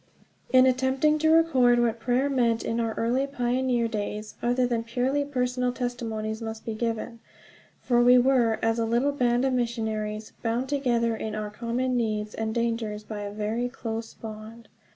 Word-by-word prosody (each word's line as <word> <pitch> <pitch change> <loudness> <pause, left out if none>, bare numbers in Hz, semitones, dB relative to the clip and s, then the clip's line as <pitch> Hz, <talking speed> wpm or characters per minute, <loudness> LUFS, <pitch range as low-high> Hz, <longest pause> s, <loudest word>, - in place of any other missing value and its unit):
IN 255 0 +7
ATTEMPTING 260 +4 +2
to 315 +1 +3
record 270 -7 +4
what 235 -1 +1
prayer 250 +4 +1
meant 240 -5 +1
in 230 - -1
our 225 -1 -1
early 250 +4 0
pioneer 250 -2 0
days, 210 -1 -4
other 245 +1 +2
than 235 -2 -1
purely 255 +5 0
personal 250 -2 -1
testimonies 230 -3 -4
must 220 0 -6
be 225 - -3
given; 230 +1 -3 0.6
for 240 -1 +3
we 250 +1 +7
were, 245 -3 +3
as 225 +1 +1
a 230 - +1
little 240 +5 +1
band 245 -2 +1
of 265 - +1
missionaries, 220 -3 -2
bound 235 +3 -1
together 240 -5 +1
in 220 -1 -4
our 210 -1 -4
common 240 +3 -2
needs 215 -3 -1
and 220 0 -3
dangers 230 -3 -1
by 210 0 -6
a 205 0 -5
very 215 +4 -2
close 225 -2 -6
bond. 220 +1 -10
235 Hz, 170 wpm, -26 LUFS, 220-250 Hz, 0.6 s, IN